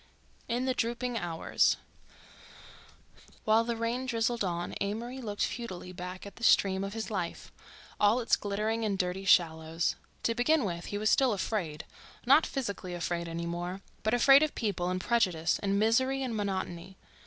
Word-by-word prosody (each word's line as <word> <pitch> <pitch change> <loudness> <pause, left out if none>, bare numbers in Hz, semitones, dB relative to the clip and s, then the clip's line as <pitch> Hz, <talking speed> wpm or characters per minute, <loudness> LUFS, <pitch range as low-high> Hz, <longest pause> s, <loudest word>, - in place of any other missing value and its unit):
IN 245 +2 -1
THE 260 - +1
DROOPING 240 +1 -2
HOURS 170 -5 +1 1.7
While 220 +1 +4
the 235 0 -2
rain 235 +3 -2
drizzled 235 -1 0
on 175 -2 -2
Amory 235 +6 -3
looked 205 -3 -1
futilely 190 -6 -6
back 180 +1 -7
at 200 - -11
the 235 - -11
stream 195 -3 +4
of 195 +2 -5
his 225 0 -4
life, 180 -5 -4 0.5
all 210 +4 +4
its 235 - +3
glitterings 215 +3 -2
and 205 -3 0
dirty 185 +1 -2
shallows. 160 -2 +2 0.3
To 230 - +2
begin 245 +3 +2
with, 170 -2 -4
he 205 - -4
was 215 +1 +2
still 260 -4 +4
afraid—not 205 - 0
physically 200 -9 -4
afraid 170 0 -2
any 165 0 -4
more, 175 +3 -4 0.2
but 215 +3 +1
afraid 270 +3 +7
of 310 -1 0
people 185 -5 -1
and 185 0 -1
prejudice 185 -7 +1
and 200 -1 0
misery 260 +6 +2
and 245 -3 -3
monotony. 190 -3 -4
205 Hz, 160 wpm, -30 LUFS, 180-235 Hz, 1.7 s, afraid